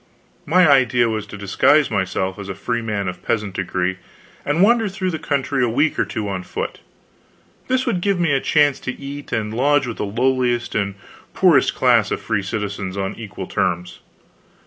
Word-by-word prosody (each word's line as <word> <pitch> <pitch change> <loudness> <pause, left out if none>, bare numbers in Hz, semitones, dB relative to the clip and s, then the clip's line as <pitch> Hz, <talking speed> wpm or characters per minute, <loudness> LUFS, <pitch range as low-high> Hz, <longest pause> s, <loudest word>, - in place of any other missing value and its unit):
My 180 +3 +5
idea 125 -4 +4
was 110 -2 -3
to - - -9
disguise 115 +9 +3
myself 95 -1 -1
as 100 -1 -7
a 95 - -4
freeman 105 -2 -2
of 90 -1 -5
peasant 105 -4 -2
degree 95 0 -2 0.5
and 155 +6 +2
wander 225 0 +4
through 190 -1 -2
the 160 - -4
country 140 -3 -1
a 120 - +2
week 145 +7 +1
or - - +2
two 105 -2 -4
on 95 -2 -3
foot. - - -5 0.9
This 255 0 +1
would 180 - 0
give 200 -1 +1
me 170 -4 +2
a 135 - +3
chance 145 -2 +3
to 130 - -6
eat 140 +1 -8
and 110 -1 -2
lodge 140 +4 +2
with 120 -2 -5
the - - -2
lowliest 120 +2 0
and 100 -2 -1 0.4
poorest - - +4
class - - +3
of - - -2
free 105 - -1
citizens 100 -1 -4
on 95 -1 -2
equal 100 -4 -7
terms. 90 -1 -2
115 Hz, 185 wpm, -20 LUFS, 100-145 Hz, 0.9 s, My